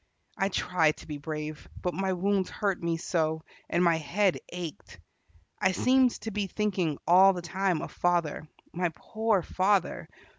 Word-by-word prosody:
I 195 - 0
tried 165 -5 +1
to - - -13
be 150 -2 -5
brave, 155 0 -6
but 180 - -2
my 190 0 -1
wounds 190 +1 0
hurt 200 -3 -1
me 170 -1 0
so, 160 -1 -1 0.3
and 175 - +2
my 170 -2 +4
head 185 +5 +1
ached. 175 -4 -7 0.6
I 190 - +2
seemed 255 +5 +4
to 225 - -4
be 205 -1 -2
thinking 185 -7 -1
all 190 +3 +7
the 175 -2 -6
time 185 -1 0
of - - -7
father. 170 -3 0 0.3
My 175 +1 0
poor 220 -4 0
father! 190 +1 0
180 Hz, 160 wpm, -28 LUFS, 165-195 Hz, 0.6 s, all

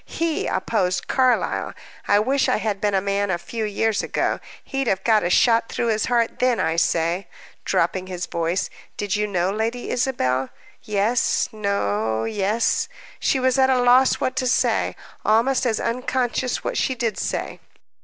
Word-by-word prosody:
He 330 -1 -1
oppose 185 -1 0
Carlyle! 255 -2 0 0.3
I 205 - +5
wish 260 +6 +2
I - - +2
had 210 -2 -2
been 205 -1 +1
a 190 - +2
man 200 +1 -1
a 175 - +1
few 215 +6 -4
years 215 +1 0
ago, - - -1 0.2
he'd 270 -1 -3
have 190 -2 0
got 220 -2 +4
a 175 - 0
shot 230 +4 +3
through 235 - -1
his 215 -1 +1
heart 235 -1 0
then. 250 -2 +2
I 160 +1 +1
say," 170 +3 +1 0.4
dropping 185 -1 0
his 180 -1 -4
voice, 170 +2 -2 0.3
"did 205 -2 -1
you 210 0 0
know 185 -2 0
Lady 225 +4 -2
Isabel?" 135 - 0 0.3
"Yes 210 +3 +1
no 110 - -1
yes." 225 - 0 0.3
She 265 - +1
was 260 +1 +2
at 265 0 +5
a 260 -1 +3
loss 250 +2 +5
what 255 - -2
to 255 - +1
say 250 - +1 0.3
almost 245 +4 +2
as 220 -2 0
unconscious 250 +1 -1
what - - -2
she 260 - 0
did 230 -4 -2
say. - - -3
220 Hz, 170 wpm, -22 LUFS, 190-250 Hz, 0.4 s, I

